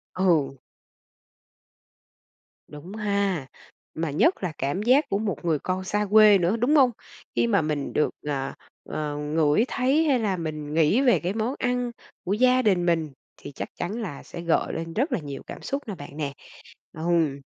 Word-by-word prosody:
Ừ. 165 Hz, -7 st, +2 dB, 2.1 s
Đúng 160 Hz, +7 st, -10 dB
ha. 200 Hz, -8 st, -1 dB, 0.5 s
Mà 160 Hz, -2 st, -2 dB
nhất 265 Hz, -, +2 dB
là 180 Hz, -, -1 dB
cảm 140 Hz, +9 st, -1 dB
giác 260 Hz, +6 st, +4 dB
của 200 Hz, -, +1 dB
một 205 Hz, -4 st, -3 dB
người 160 Hz, -3 st, +1 dB
con 185 Hz, +3 st, -2 dB
xa 210 Hz, +2 st, -1 dB
quê 215 Hz, -2 st, +8 dB
nữa, 180 Hz, +5 st, +1 dB
đúng 250 Hz, +7 st, +2 dB
hông? 265 Hz, -4 st, +6 dB, 0.4 s
Khi -, -, +2 dB
mà 200 Hz, -6 st, +3 dB
mình 150 Hz, -2 st, -2 dB
được, 150 Hz, -, +2 dB, 0.2 s
à, 135 Hz, -2 st, -2 dB, 0.4 s
à, 150 Hz, -1 st, -2 dB
ngửi 150 Hz, +5 st, +2 dB
thấy 270 Hz, +5 st, +2 dB
hay 270 Hz, -4 st, +3 dB
là 200 Hz, -5 st, 0 dB
mình 155 Hz, -2 st, -5 dB
nghĩ 165 Hz, -, +3 dB
về 255 Hz, -3 st, +4 dB
cái 180 Hz, +3 st, -2 dB
món 225 Hz, +5 st, -1 dB
ăn 245 Hz, -1 st, 0 dB, 0.3 s
của 190 Hz, -, -1 dB
gia 255 Hz, +3 st, +4 dB
đình 185 Hz, -6 st, +2 dB
mình 165 Hz, -4 st, +1 dB, 0.3 s
thì -, -, -9 dB
chắc -, -, -6 dB
chắn 210 Hz, +7 st, -4 dB
là 170 Hz, -10 st, -6 dB
sẽ 170 Hz, -, -8 dB
gợi 170 Hz, -1 st, +1 dB
lên 165 Hz, 0 st, -5 dB
rất 265 Hz, +8 st, 0 dB
là -, -, 0 dB
nhiều 145 Hz, -3 st, -7 dB
cảm -, -, -8 dB
xúc 280 Hz, +1 st, -3 dB
nè 205 Hz, -, -4 dB
bạn 145 Hz, -1 st, -10 dB
nè. 145 Hz, -3 st, -3 dB, 0.6 s
Ừm. 160 Hz, -4 st, 0 dB
180 Hz, 180 wpm, -25 LUFS, 155-220 Hz, 2.1 s, quê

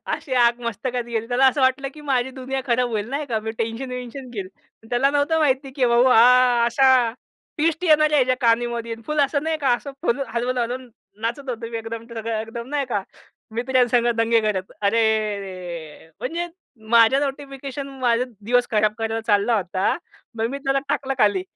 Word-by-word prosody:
अशी 265 Hz, -, -4 dB
आग 240 Hz, 0 st, +3 dB
मस्तकात 240 Hz, +2 st, -3 dB
गेली. 230 Hz, -1 st, -3 dB
त्याला 255 Hz, +2 st, +4 dB
असं 270 Hz, +2 st, +2 dB
वाटलं 260 Hz, +1 st, +2 dB
की 305 Hz, -, -11 dB
माझी 260 Hz, -1 st, +1 dB
दुनिया 265 Hz, +1 st, -4 dB
खराब 245 Hz, 0 st, +2 dB
होईल 215 Hz, 0 st, -2 dB
नाही 285 Hz, +1 st, -2 dB
का. 225 Hz, -4 st, -1 dB
मी 220 Hz, -, -4 dB
टेन्शन 230 Hz, +3 st, -3 dB
वेंशन 250 Hz, +1 st, -7 dB
घेईल. 195 Hz, -5 st, -5 dB, 0.4 s
त्याला 260 Hz, +3 st, +3 dB
नव्हतं 290 Hz, +3 st, +1 dB
माहिती 270 Hz, -2 st, +1 dB
की 260 Hz, -, +2 dB
भाऊ 235 Hz, +1 st, +4 dB
हा 250 Hz, 0 st, +6 dB
अशा 265 Hz, +3 st, +3 dB, 0.7 s
ट्विस्ट 320 Hz, +3 st, +1 dB
येणाऱ्या 305 Hz, -2 st, +4 dB
ह्याच्या 255 Hz, 0 st, +2 dB
कानामध्ये 235 Hz, -1 st, +1 dB
फुल 300 Hz, -1 st, 0 dB
असं 285 Hz, +1 st, +1 dB
नाही 320 Hz, 0 st, -1 dB
का 280 Hz, -, -3 dB
आणि 240 Hz, -, +4 dB
असं 280 Hz, +3 st, -9 dB
फुल 275 Hz, -4 st, +1 dB
हलवून-हलवून 245 Hz, +1 st, -2 dB, 0.3 s
नाचत 250 Hz, +4 st, -3 dB
होतो 230 Hz, -1 st, -4 dB
मी 230 Hz, -, -4 dB
एकदम 225 Hz, 0 st, -7 dB
सगळं 225 Hz, -1 st, -3 dB
एकदम 235 Hz, +2 st, -7 dB
नाही 285 Hz, -2 st, -1 dB
का 205 Hz, -5 st, -1 dB, 0.5 s
मित्रांस 250 Hz, 0 st, +1 dB, 0.2 s
दंगे 230 Hz, 0 st, +3 dB
करत. 200 Hz, -3 st, -2 dB
अरेरे! 200 Hz, -7 st, -1 dB
म्हणजे 335 Hz, +8 st, -3 dB, 0.4 s
माझ्या 235 Hz, +4 st, +6 dB
नोटिफिकेशन, 275 Hz, 0 st, -5 dB
माझा 245 Hz, -1 st, +2 dB, 0.2 s
दिवस 245 Hz, +4 st, +1 dB
खराब 215 Hz, -1 st, +2 dB
करायला 225 Hz, 0 st, -2 dB
चालला 210 Hz, +2 st, +3 dB
होता 190 Hz, 0 st, 0 dB, 0.4 s
मग 225 Hz, -, +1 dB
मी 280 Hz, -, -4 dB
त्याला 275 Hz, -1 st, 0 dB
टाकलं 270 Hz, -1 st, -1 dB
खाली. 205 Hz, -4 st, +3 dB
245 Hz, 175 wpm, -22 LUFS, 225-270 Hz, 0.7 s, हा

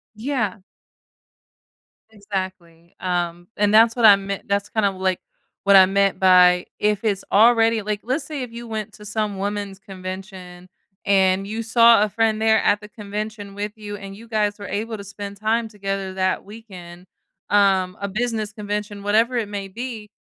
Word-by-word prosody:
Yeah. 220 Hz, -4 st, -2 dB, 1.5 s
Exactly. 185 Hz, -5 st, -7 dB
Um, 175 Hz, -1 st, -2 dB
and 205 Hz, 0 st, +2 dB
that's 225 Hz, +1 st, +6 dB
what 235 Hz, -2 st, +2 dB
I 205 Hz, -, +10 dB
meant 195 Hz, 0 st, -6 dB
that's 200 Hz, 0 st, -1 dB
kind 220 Hz, -2 st, 0 dB
of, 195 Hz, -1 st, 0 dB
like, 185 Hz, -1 st, -1 dB, 0.4 s
what 200 Hz, 0 st, +5 dB
I 190 Hz, -1 st, +9 dB
meant 195 Hz, -1 st, +1 dB
by 180 Hz, -1 st, +5 dB
if 210 Hz, 0 st, 0 dB
it's 200 Hz, -3 st, 0 dB
already 225 Hz, 0 st, +5 dB
like 210 Hz, 0 st, -3 dB
let's 265 Hz, +5 st, -1 dB
say 285 Hz, -3 st, -5 dB
if 245 Hz, -, -8 dB
you 235 Hz, 0 st, -8 dB
went 215 Hz, -1 st, -5 dB
to 210 Hz, -, -14 dB
some 210 Hz, -2 st, -2 dB
woman's 200 Hz, -1 st, -4 dB
convention 185 Hz, -2 st, -9 dB, 0.4 s
and 195 Hz, 0 st, +3 dB
you 225 Hz, +2 st, -4 dB
saw 230 Hz, -1 st, +6 dB
a 215 Hz, -, 0 dB
friend 220 Hz, +1 st, +1 dB
there 220 Hz, 0 st, +3 dB
at 205 Hz, 0 st, +2 dB
the 210 Hz, -, -10 dB
convention 210 Hz, -1 st, -6 dB
with 205 Hz, +1 st, -4 dB
you 210 Hz, -1 st, -7 dB
and 195 Hz, 0 st, -9 dB
you 230 Hz, +3 st, -13 dB
guys 210 Hz, -2 st, -1 dB
were 200 Hz, -, -7 dB
able 220 Hz, +2 st, -3 dB
to 200 Hz, -, -8 dB
spend 200 Hz, +1 st, -8 dB
time 225 Hz, +2 st, 0 dB
together 195 Hz, -2 st, -4 dB
that 185 Hz, 0 st, -1 dB
weekend, 185 Hz, -5 st, -12 dB, 0.4 s
um, 190 Hz, -2 st, +2 dB
a 200 Hz, -, -3 dB
business 215 Hz, 0 st, -2 dB
convention, 205 Hz, -1 st, -5 dB
whatever 225 Hz, +5 st, +2 dB
it 215 Hz, -3 st, -2 dB
may 200 Hz, -1 st, -5 dB
be, 225 Hz, 0 st, -7 dB
205 Hz, 175 wpm, -22 LUFS, 195-220 Hz, 1.5 s, I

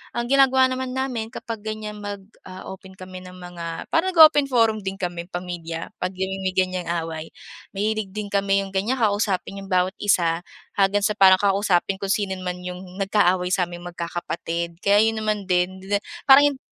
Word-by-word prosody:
ang 240 Hz, -, -1 dB
ginagawa 265 Hz, -1 st, +5 dB
naman 255 Hz, 0 st, -3 dB
namin 255 Hz, -4 st, -2 dB
kapag 230 Hz, -3 st, -6 dB
ganyan 215 Hz, -1 st, -5 dB
mag, 205 Hz, -1 st, -6 dB, 0.2 s
ah, 185 Hz, 0 st, -9 dB
open 190 Hz, 0 st, -12 dB
kami 185 Hz, -1 st, -9 dB
ng 180 Hz, 0 st, -11 dB
mga 175 Hz, -2 st, -7 dB
parang 355 Hz, +3 st, +2 dB
nag-o-open 310 Hz, -3 st, +7 dB
forum 225 Hz, -3 st, +3 dB
din 190 Hz, 0 st, -3 dB
kami 175 Hz, -1 st, -4 dB
pamilya 175 Hz, -2 st, -6 dB
'pag 180 Hz, +1 st, -2 dB
namimi 190 Hz, 0 st, -2 dB
ganyang 185 Hz, -2 st, 0 dB, 0.2 s
away. 160 Hz, -1 st, -7 dB, 0.4 s
Mahilig 210 Hz, -1 st, -1 dB
din 210 Hz, -1 st, -4 dB
kami 195 Hz, 0 st, +1 dB
yung 195 Hz, -, -10 dB
ganya 200 Hz, +7 st, 0 dB
kausapin 200 Hz, -2 st, 0 dB
yung -, -, -11 dB
bawat 185 Hz, 0 st, +2 dB
isa 170 Hz, -5 st, +2 dB, 0.4 s
hanggang 200 Hz, +1 st, +2 dB
sa 210 Hz, 0 st, +1 dB
para 190 Hz, -2 st, +8 dB
kausapin 195 Hz, -2 st, +1 dB
kung 195 Hz, -1 st, -2 dB
sino 205 Hz, -3 st, 0 dB
man 180 Hz, -1 st, -4 dB
yung 180 Hz, +1 st, -8 dB
nagkaaway 185 Hz, -2 st, +2 dB
saming 175 Hz, -2 st, -1 dB
magkakapatid 170 Hz, 0 st, -4 dB
kaya 205 Hz, +2 st, +5 dB
yun 220 Hz, -, -4 dB
naman 210 Hz, -2 st, -1 dB
din, 180 Hz, +1 st, 0 dB
di 190 Hz, -, -12 dB
na 205 Hz, -, +3 dB, 0.3 s
parang 285 Hz, +1 st, +8 dB
yung 265 Hz, -, -13 dB
195 Hz, 180 wpm, -23 LUFS, 180-215 Hz, 0.4 s, para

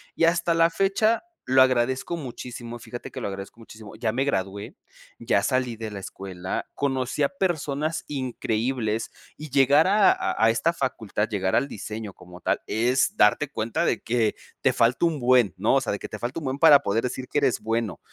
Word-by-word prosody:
y 165 Hz, -, +3 dB
hasta 170 Hz, 0 st, +2 dB
la 165 Hz, 0 st, +4 dB
fecha 200 Hz, +5 st, +1 dB, 0.2 s
lo 130 Hz, +1 st, +5 dB
agradezco 130 Hz, +5 st, 0 dB
muchísimo, 120 Hz, -4 st, -7 dB
fíjate 120 Hz, +1 st, -8 dB
que -, -, -6 dB
lo -, -, -2 dB
agradezco 100 Hz, +3 st, -8 dB
muchísimo. 110 Hz, -2 st, -12 dB
Ya 110 Hz, -2 st, -1 dB
me 130 Hz, +3 st, +1 dB
gradué, 100 Hz, -5 st, -3 dB, 0.4 s
ya 115 Hz, -4 st, +1 dB
salí 130 Hz, -1 st, 0 dB
de 110 Hz, -1 st, -6 dB
la 100 Hz, -, -6 dB
escuela, 95 Hz, -1 st, -6 dB
conocí 135 Hz, 0 st, -1 dB
a 140 Hz, -, +2 dB
personas 155 Hz, -4 st, -2 dB
increíbles, 120 Hz, -4 st, -2 dB, 0.3 s
y 155 Hz, -1 st, -8 dB
llegar 140 Hz, +5 st, +5 dB
a 205 Hz, 0 st, +5 dB
a 110 Hz, -, 0 dB
a 115 Hz, -, +6 dB
esta 115 Hz, +9 st, +1 dB
facultad, 115 Hz, -8 st, -2 dB
llegar 95 Hz, -3 st, 0 dB
al 140 Hz, -, +2 dB
diseño 105 Hz, 0 st, -6 dB
como 90 Hz, -1 st, -14 dB
tal -, -, 0 dB
es 125 Hz, -, +1 dB
darte 150 Hz, -, +4 dB
cuenta 110 Hz, -2 st, -1 dB
de -, -, +1 dB
que 115 Hz, -2 st, +1 dB, 0.3 s
te 130 Hz, -, +3 dB
falta 120 Hz, +4 st, +2 dB
un 160 Hz, -3 st, -2 dB
buen, 125 Hz, -5 st, +4 dB
¿no? -, -, +2 dB
O -, -, +3 dB
sea, -, -, -2 dB
de -, -, -4 dB
que -, -, -6 dB
te -, -, -7 dB
falta 125 Hz, +7 st, -3 dB
un 155 Hz, -, -8 dB
buen 135 Hz, +1 st, -3 dB
para 150 Hz, -3 st, +8 dB
poder 105 Hz, +3 st, 0 dB
decir 125 Hz, +1 st, -4 dB
que -, -, 0 dB
eres 135 Hz, -4 st, +1 dB
bueno, 115 Hz, -3 st, -2 dB
125 Hz, 200 wpm, -25 LUFS, 110-145 Hz, 0.4 s, para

